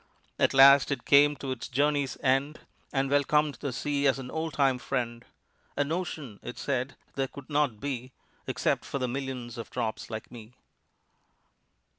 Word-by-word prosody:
At -, -, +3 dB
last 135 Hz, 0 st, +8 dB
it 140 Hz, -, -3 dB
came 145 Hz, +1 st, +6 dB
to 135 Hz, -1 st, -5 dB
its 130 Hz, -2 st, -5 dB
journey's 140 Hz, 0 st, 0 dB
end, 135 Hz, +3 st, +1 dB, 0.3 s
And 135 Hz, -1 st, +1 dB
welcomed 145 Hz, +1 st, +2 dB
the 140 Hz, -, -2 dB
sea 140 Hz, +2 st, 0 dB
as 135 Hz, -, +3 dB
an 130 Hz, -2 st, -7 dB
old 160 Hz, -1 st, -3 dB
time 135 Hz, -3 st, +2 dB
friend. 120 Hz, -4 st, -3 dB, 0.5 s
"An 145 Hz, +1 st, 0 dB
ocean," 155 Hz, -, -4 dB
it -, -, -7 dB
said, 130 Hz, -1 st, -2 dB, 0.2 s
"there 135 Hz, -1 st, -1 dB
could 140 Hz, +2 st, -12 dB
not 145 Hz, -7 st, +1 dB
be 130 Hz, -2 st, -4 dB, 0.4 s
Except -, -, 0 dB
for -, -, -4 dB
the 130 Hz, -2 st, -1 dB
millions 125 Hz, -2 st, -5 dB
of 115 Hz, -, -7 dB
drops 115 Hz, -3 st, -3 dB
like 110 Hz, 0 st, -6 dB
me." 115 Hz, -1 st, -11 dB
135 Hz, 165 wpm, -28 LUFS, 125-145 Hz, 0.5 s, last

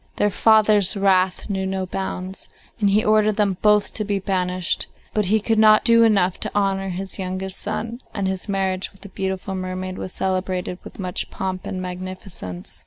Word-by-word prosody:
Their 205 Hz, -, +2 dB
father's 215 Hz, -2 st, +4 dB
wrath 190 Hz, -2 st, +2 dB
knew 190 Hz, -2 st, -2 dB
no 190 Hz, 0 st, -2 dB
bounds, 190 Hz, 0 st, -5 dB, 0.3 s
and 205 Hz, -2 st, +3 dB
he 210 Hz, +2 st, +3 dB
ordered 215 Hz, 0 st, +3 dB
them 200 Hz, -3 st, +1 dB
both 210 Hz, -1 st, +3 dB
to 215 Hz, -, -2 dB
be 205 Hz, -1 st, -1 dB
banished, 185 Hz, -2 st, 0 dB, 0.3 s
but 210 Hz, -1 st, +1 dB
he 215 Hz, +4 st, +3 dB
could 220 Hz, +1 st, +1 dB
not 215 Hz, 0 st, +6 dB
do 230 Hz, 0 st, +6 dB
enough 195 Hz, -5 st, +3 dB
to -, -, -4 dB
honour 195 Hz, -1 st, +1 dB
his 190 Hz, +2 st, -4 dB
youngest 185 Hz, 0 st, -4 dB
son, 225 Hz, +3 st, -4 dB
and 195 Hz, -1 st, -2 dB
his 190 Hz, +2 st, -2 dB
marriage 190 Hz, -1 st, -1 dB
with 195 Hz, -, -19 dB
the 200 Hz, -, -10 dB
beautiful 190 Hz, 0 st, -3 dB
mermaid 185 Hz, 0 st, -4 dB
was 185 Hz, -, -4 dB
celebrated 185 Hz, -1 st, -2 dB
with -, -, -11 dB
much 180 Hz, -2 st, -3 dB
pomp 185 Hz, -1 st, -4 dB
and 185 Hz, -1 st, -4 dB
magnificence. 180 Hz, -, -6 dB
190 Hz, 180 wpm, -22 LUFS, 185-210 Hz, 0.3 s, not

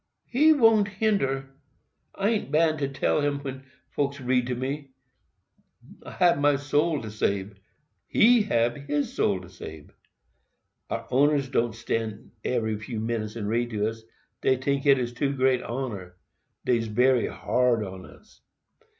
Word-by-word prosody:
"He 300 Hz, +6 st, +4 dB
won't 225 Hz, -8 st, +5 dB
hinder—I 195 Hz, -1 st, -3 dB
an't 215 Hz, -11 st, -1 dB
bound 155 Hz, 0 st, +3 dB, 0.2 s
tell 150 Hz, -, +1 dB
him 145 Hz, 0 st, 0 dB
when 135 Hz, -1 st, -7 dB, 0.3 s
folks 140 Hz, 0 st, -2 dB
reads 125 Hz, -1 st, +1 dB
to 125 Hz, -, -1 dB
me. 135 Hz, +3 st, -4 dB, 1.1 s
I -, -, -9 dB
hab 175 Hz, -5 st, +3 dB
my 145 Hz, 0 st, +4 dB
soul 145 Hz, +1 st, 0 dB
to 110 Hz, -, -6 dB
sabe—he 105 Hz, -, 0 dB
hab 120 Hz, -, +1 dB
his 145 Hz, 0 st, -1 dB
soul 95 Hz, -3 st, +1 dB
to 90 Hz, -, -12 dB
sabe. 80 Hz, -4 st, -11 dB, 1.0 s
Our -, -, -3 dB
owners 140 Hz, 0 st, +2 dB
won't 115 Hz, -1 st, +1 dB
stand 115 Hz, -1 st, -4 dB
few 110 Hz, -1 st, -2 dB
minutes 110 Hz, -1 st, -3 dB
and 105 Hz, -3 st, -4 dB
read 120 Hz, +2 st, 0 dB
to 105 Hz, -1 st, 0 dB
us—dey 115 Hz, +3 st, -3 dB
tink 140 Hz, +2 st, -1 dB
it 125 Hz, -3 st, +3 dB
too 140 Hz, +2 st, 0 dB
great 130 Hz, -1 st, +2 dB
honor—dey's 115 Hz, 0 st, -4 dB
bery 125 Hz, +3 st, +3 dB
hard 125 Hz, -3 st, +1 dB
on 95 Hz, -1 st, -9 dB
us. -, -, -19 dB
130 Hz, 135 wpm, -26 LUFS, 115-145 Hz, 1.1 s, won't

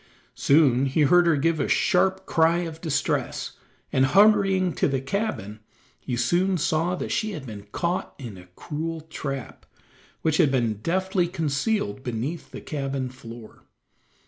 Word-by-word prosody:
Soon 140 Hz, -3 st, +3 dB
he 135 Hz, +4 st, +1 dB
heard 175 Hz, +4 st, +5 dB
her 165 Hz, -, +4 dB
give 160 Hz, +2 st, +1 dB
a -, -, 0 dB
sharp 190 Hz, +1 st, +2 dB
cry 165 Hz, +1 st, +3 dB
of 165 Hz, -2 st, -6 dB
distress, 160 Hz, -5 st, -1 dB, 0.4 s
and 130 Hz, 0 st, +4 dB
hurrying 195 Hz, -1 st, +4 dB
to -, -, +1 dB
the 135 Hz, -2 st, 0 dB
cabin 135 Hz, -, -3 dB, 0.4 s
he 125 Hz, -, -4 dB
soon 180 Hz, +10 st, +1 dB
saw 165 Hz, +3 st, 0 dB
that -, -, -5 dB
she 215 Hz, -1 st, -1 dB
had 150 Hz, -6 st, -7 dB
been 105 Hz, -4 st, -9 dB
caught 175 Hz, +1 st, -2 dB
in 120 Hz, -7 st, -8 dB
a 90 Hz, -1 st, -13 dB
cruel 160 Hz, +1 st, -4 dB
trap, 140 Hz, -4 st, -6 dB, 0.6 s
which 160 Hz, -1 st, +2 dB
had 165 Hz, -6 st, +4 dB
been 120 Hz, -6 st, 0 dB
deftly 185 Hz, -, 0 dB
concealed 155 Hz, -, -1 dB
beneath 130 Hz, +7 st, -4 dB
the -, -, -9 dB
cabin 135 Hz, -3 st, -3 dB
floor. 115 Hz, -3 st, -12 dB
155 Hz, 150 wpm, -25 LUFS, 130-180 Hz, 0.6 s, heard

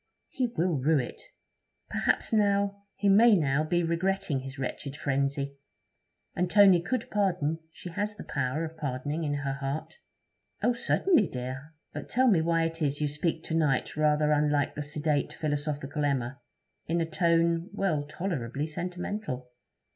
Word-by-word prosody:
'He 255 Hz, -2 st, 0 dB
will 175 Hz, -, 0 dB
rue 155 Hz, +4 st, +3 dB
it. 125 Hz, -3 st, -3 dB, 0.7 s
Perhaps -, -, 0 dB
now... 200 Hz, -1 st, +2 dB
he 205 Hz, -, 0 dB
may 215 Hz, +3 st, +7 dB
now 150 Hz, -3 st, +2 dB
be 175 Hz, +2 st, +1 dB
regretting 170 Hz, -2 st, 0 dB
his 135 Hz, +1 st, -8 dB
wretched 135 Hz, +1 st, -4 dB
frenzy. 140 Hz, 0 st, -1 dB, 0.8 s
And 180 Hz, 0 st, 0 dB
Tony 195 Hz, -3 st, +7 dB
could 235 Hz, +6 st, -3 dB
pardon; 180 Hz, -6 st, +1 dB
she 180 Hz, -, -9 dB
has 205 Hz, +4 st, -2 dB
the -, -, -8 dB
power 140 Hz, +4 st, -1 dB
of 160 Hz, 0 st, -8 dB
pardoning 145 Hz, +2 st, -3 dB
in 145 Hz, -1 st, -1 dB
her 140 Hz, -1 st, -2 dB
heart.' 140 Hz, +2 st, -4 dB, 0.7 s
'Oh! 245 Hz, -, +4 dB
certainly, 235 Hz, -, +3 dB
dear. 130 Hz, +4 st, -6 dB, 0.2 s
But -, -, -6 dB
tell 255 Hz, +2 st, +3 dB
me 180 Hz, -7 st, +4 dB
why 165 Hz, 0 st, +2 dB
it 165 Hz, 0 st, -3 dB
is 145 Hz, -1 st, 0 dB
you 150 Hz, -, +1 dB
speak 160 Hz, +2 st, -2 dB
to -, -, -4 dB
night 150 Hz, -5 st, +1 dB
rather 150 Hz, 0 st, +3 dB
unlike 145 Hz, -1 st, +2 dB
the 150 Hz, -, -4 dB
sedate, 150 Hz, 0 st, -1 dB
philosophical 145 Hz, -1 st, -2 dB
Emma; 135 Hz, -2 st, -1 dB, 0.5 s
in 170 Hz, +2 st, +1 dB
a 165 Hz, -, +1 dB
tone 170 Hz, +1 st, +2 dB
well, 195 Hz, -7 st, 0 dB
tolerably 145 Hz, -4 st, -3 dB
sentimental?' 175 Hz, -, -4 dB
155 Hz, 155 wpm, -28 LUFS, 140-180 Hz, 0.8 s, may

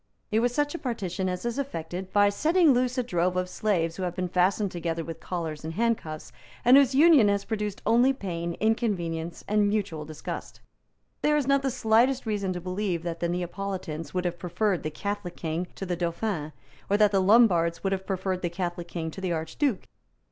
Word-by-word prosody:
It 215 Hz, -, +3 dB
was 245 Hz, +1 st, +2 dB
such 290 Hz, +3 st, 0 dB
a 340 Hz, -, -4 dB
partition 190 Hz, -7 st, -2 dB
as 180 Hz, +4 st, -4 dB
is 235 Hz, +3 st, -2 dB
effected 185 Hz, -, -5 dB
by 205 Hz, -1 st, +5 dB
setting 315 Hz, -, +4 dB
loose 250 Hz, +1 st, +1 dB
a 250 Hz, -, +2 dB
drove 180 Hz, -4 st, 0 dB
of 180 Hz, 0 st, 0 dB
slaves 180 Hz, -4 st, -1 dB
who -, -, -5 dB
have 180 Hz, -1 st, -2 dB
been 180 Hz, -1 st, -2 dB
fastened 185 Hz, +3 st, +2 dB
together 165 Hz, -1 st, -3 dB
with 165 Hz, 0 st, -7 dB
collars 160 Hz, -4 st, -4 dB
and 160 Hz, +1 st, -5 dB
handcuffs, 160 Hz, -, -1 dB, 0.3 s
and 245 Hz, +2 st, +8 dB
whose 275 Hz, -1 st, +5 dB
union 295 Hz, -6 st, +7 dB
has 200 Hz, 0 st, +1 dB
produced 210 Hz, -2 st, -3 dB
only 240 Hz, +4 st, +5 dB
pain, 170 Hz, -9 st, -4 dB
inconvenience 175 Hz, -7 st, -1 dB
and 210 Hz, -1 st, +3 dB
mutual 200 Hz, -7 st, -2 dB
disgust. 155 Hz, 0 st, -7 dB, 0.6 s
There 300 Hz, 0 st, +3 dB
is 290 Hz, -, 0 dB
not 275 Hz, 0 st, +3 dB
the 270 Hz, -, 0 dB
slightest 245 Hz, +2 st, +2 dB
reason 205 Hz, -3 st, -1 dB
to 180 Hz, -, -4 dB
believe 185 Hz, -1 st, -2 dB
that 170 Hz, -1 st, -4 dB
the 170 Hz, -, -1 dB
Neapolitans 175 Hz, -2 st, -4 dB
would 180 Hz, -1 st, -2 dB
have 175 Hz, 0 st, -2 dB
preferred 185 Hz, +1 st, 0 dB
the 155 Hz, -, -3 dB
Catholic 200 Hz, +2 st, -4 dB
King 165 Hz, +2 st, -3 dB
to 195 Hz, -, -5 dB
the 180 Hz, -1 st, -1 dB
Dauphin, 170 Hz, -2 st, -2 dB, 0.4 s
or 200 Hz, -, +3 dB
that 210 Hz, -1 st, +5 dB
the 195 Hz, -2 st, +3 dB
Lombards 185 Hz, -5 st, +4 dB
would 195 Hz, 0 st, +1 dB
have 190 Hz, 0 st, -4 dB
preferred 190 Hz, -1 st, -2 dB
the 175 Hz, -, -1 dB
Catholic 175 Hz, -1 st, -4 dB
King 165 Hz, -2 st, -4 dB
to 190 Hz, -, -8 dB
the 185 Hz, -2 st, -1 dB
Archduke. 175 Hz, -, -1 dB
190 Hz, 200 wpm, -27 LUFS, 170-220 Hz, 0.6 s, and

